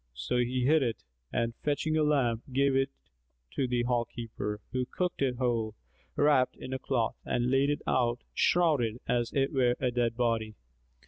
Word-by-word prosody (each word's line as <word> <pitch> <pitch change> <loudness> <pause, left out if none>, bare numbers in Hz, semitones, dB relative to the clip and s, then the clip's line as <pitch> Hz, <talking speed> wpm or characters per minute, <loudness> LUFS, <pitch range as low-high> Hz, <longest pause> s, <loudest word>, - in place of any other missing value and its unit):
So 60 - -2
he 125 +1 +1
hid 155 +3 +4
it 115 -4 -2 0.3
and 115 0 0
fetching 150 +2 0
a 155 - +3
lamb, 135 -7 +2
gave 135 +1 +2
it 135 0 +2 0.6
to 135 - -1
the 120 -1 0
hall 120 -1 +1
keeper 115 -3 -5
who 130 -1 -1
cooked 180 -4 -2
it 130 -2 +1
whole, 115 -3 -1 0.4
wrapped 145 -3 +3
in 130 - -7
a 130 - -2
cloth, 120 -5 -1
and 120 +1 0
laid 135 +1 +3
it 145 - -1
out 120 -1 +1
shrouded 145 -10 +2
as 120 -1 0
it 135 +1 0
were 125 -3 +3
a 125 -2 0
dead 120 -1 0
body. 115 -3 0
125 Hz, 180 wpm, -30 LUFS, 120-135 Hz, 0.6 s, hid